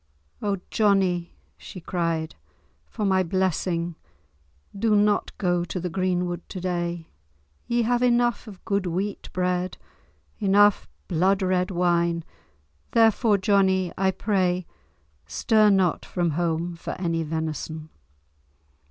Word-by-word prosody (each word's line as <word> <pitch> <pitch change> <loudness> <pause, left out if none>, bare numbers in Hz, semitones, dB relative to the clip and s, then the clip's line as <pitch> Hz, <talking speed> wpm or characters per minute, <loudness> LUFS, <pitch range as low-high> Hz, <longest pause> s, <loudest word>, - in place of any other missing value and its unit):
"O 200 -1 0
Johnie!" 190 -5 +1 0.2
she 185 - -9
cried, 165 -2 -2 0.5
"for 215 - -4
my 190 -1 +3
blessing, 175 -1 -1 0.8
do 215 +1 +2
not 205 0 +2
go 175 -3 +1
to 180 - -4
the 180 0 -4
greenwood 180 -1 -1
to 190 - -6
day. 175 -2 -3 0.6
Ye 235 0 +1
have 240 +1 +1
enough 240 -2 +2
of 200 -4 -12
good 200 -2 0
wheat 190 +4 -3
bread, 180 0 -1 0.6
enough 205 - +4 0.2
blood 190 +4 +2
red 185 -1 +1
wine, 170 -2 +1 0.7
therefore, 225 -1 +4
Johnie, 190 -2 +2
I 190 0 +2
pray, 185 -2 0 0.6
stir 215 -2 +3
not 190 -4 +2
from 175 -2 -1
home 170 +1 -1
for 165 - -6
any 165 -2 0
venison." 160 0 -4
185 Hz, 115 wpm, -25 LUFS, 175-200 Hz, 0.8 s, enough